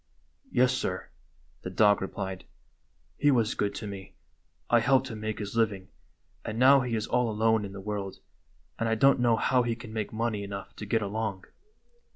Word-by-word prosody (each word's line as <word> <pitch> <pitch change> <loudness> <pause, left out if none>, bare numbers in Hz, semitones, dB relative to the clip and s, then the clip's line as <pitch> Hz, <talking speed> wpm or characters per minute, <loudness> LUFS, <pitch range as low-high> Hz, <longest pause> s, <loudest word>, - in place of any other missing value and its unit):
" - - -43
Yes, 125 +1 +4
sir," 130 - -3 0.5
the - - -5
dog 100 +2 +4
replied. 95 -1 -5 0.4
" - - -41
He 145 - +4
was 115 -6 +2
good 100 - -1
to - - -5
me; 100 -2 -8 0.5
I 120 - +5
helped 130 +2 +2
him 110 -2 -6
make 110 0 -3
his 105 +1 -5
living, 100 -5 0 0.5
and 110 - -5
now 135 +3 +7
he 125 -2 -2
is 110 -1 -1
all 125 -1 +1
alone 110 0 +2
in 100 - -6
the 100 - -7
world, 100 -1 -4 0.6
and 115 - 0
I 115 - +2
don't 135 +4 +4
know 120 -2 +4
how 125 +2 +2
he 120 -1 -1
can 115 -1 -10
make 110 -2 -3
money 110 -2 -2
enough 100 0 -7
to 105 - -7
get 110 +1 +1
along." 100 -2 -3
110 Hz, 195 wpm, -28 LUFS, 100-120 Hz, 0.6 s, now